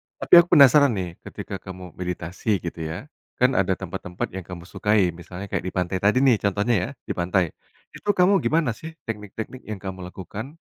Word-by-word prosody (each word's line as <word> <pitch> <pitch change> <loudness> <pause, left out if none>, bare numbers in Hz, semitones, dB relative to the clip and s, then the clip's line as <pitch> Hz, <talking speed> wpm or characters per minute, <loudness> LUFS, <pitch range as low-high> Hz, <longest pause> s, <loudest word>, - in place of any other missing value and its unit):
tapi - - -5
aku 170 0 +4
penasaran 140 -2 +7
nih 90 -3 -5
ketika 95 - -6
kamu 95 -1 -9
meditasi 90 +4 -2
gitu 85 -1 -5
ya, 80 - -6 0.2
kan 125 +1 +3
ada 95 -6 +1
tempat-tempat 90 -1 -5
yang 95 -2 -7
kamu 90 -2 -8
sukai 100 0 +1
misalnya 90 +3 -9
kayak - - 0
di - - -3
pantai 90 0 -1
tadi 105 +7 +3
nih 125 -6 +5
contohnya 105 +4 +1
ya 90 - -2
di - - -5
pantai, 85 -1 +1 0.4
itu - - -14
kamu 185 +1 +5
gimana 155 -4 +1
sih 160 +8 -9
teknik-teknik 110 +3 -6
yang 110 - -3
kamu 95 -2 -7
lakukan, 110 - -8
95 Hz, 185 wpm, -24 LUFS, 90-120 Hz, 0.4 s, penasaran